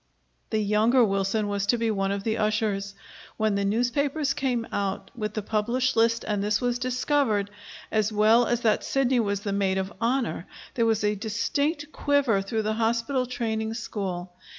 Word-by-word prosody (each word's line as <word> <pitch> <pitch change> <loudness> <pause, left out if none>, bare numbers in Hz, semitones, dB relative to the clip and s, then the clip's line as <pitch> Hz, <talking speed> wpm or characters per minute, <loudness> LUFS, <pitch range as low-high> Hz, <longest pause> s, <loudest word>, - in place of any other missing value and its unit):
The 220 - 0
younger 215 +4 +3
Wilson 195 +1 0
was 200 0 -1
to 240 - +3
be 230 -1 0
one 195 -2 0
of 200 0 -3
the 220 0 0
ushers. 210 -2 0 0.4
When 215 -1 +1
the 200 0 0
newspapers 275 +7 0
came 250 -4 -1
out 200 -1 -3
with 215 -3 -4
the 215 - -2
published 235 +5 0
list 230 0 +2
and 205 -2 0
this 210 0 +1
was 245 -1 -1
discovered, 250 -5 0 0.4
as 215 -1 +1
well 220 +3 +4
as 240 0 0
that 220 -3 +2
Sidney 265 -2 +1
was 200 -3 0
the 200 -1 -3
maid 195 -1 +1
of 190 +1 -3
honor, 230 -8 0 0.3
there 230 -2 +1
was 220 -1 +1
a 210 0 +2
distinct 285 - -2
quiver 280 -11 +2
through 220 +3 -2
the 215 +1 0
hospital 230 +3 0
training 225 -2 -2
school. 185 -6 -4
220 Hz, 175 wpm, -26 LUFS, 205-245 Hz, 0.4 s, well